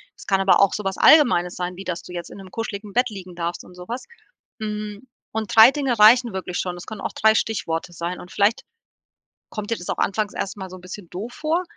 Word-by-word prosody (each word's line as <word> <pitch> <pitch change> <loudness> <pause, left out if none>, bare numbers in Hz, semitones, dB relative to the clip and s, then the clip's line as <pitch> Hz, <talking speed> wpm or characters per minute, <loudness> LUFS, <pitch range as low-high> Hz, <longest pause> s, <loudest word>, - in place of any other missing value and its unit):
Es - - -14
kann 195 -1 +2
aber 195 - +5
auch 200 - +4
so 210 - -3
was 190 0 -2
Allgemeines 230 - +5
sein, 180 0 -4
wie 190 - -8
dass 180 -2 -4
du 180 - -11
jetzt 175 -1 -6
in - - -10
'nem 190 -2 -12
kuscheligen 210 -2 -5
Bett 250 +3 +2
liegen 185 -4 -9
darfst 170 0 -4
und 180 - -15
so 180 0 -10
was. 245 +2 -4 0.6
Hm, 210 +1 -5 0.3
und 220 -1 -3
3 225 +3 +10
Dinge 270 -6 -1
reichen 235 +3 +7
wirklich 185 -1 -4
schon. 180 -1 -3
Es 175 - -9
können 220 -2 -7
auch - - -3
3 220 0 +4
Stichworte 175 -6 -1
sein 170 +2 -4
und 180 - -12
vielleicht 205 +2 +2 0.9
kommt 210 0 -6
dir 230 - +1
das 175 - -9
auch - - -1
anfangs 210 +1 0
erst 195 +1 -4
mal 190 -1 -7
so 185 - -9
'n - - -15
bisschen 185 0 -9
doof 205 +7 -6
vor, 320 +4 -1
200 Hz, 245 wpm, -23 LUFS, 180-220 Hz, 0.9 s, 3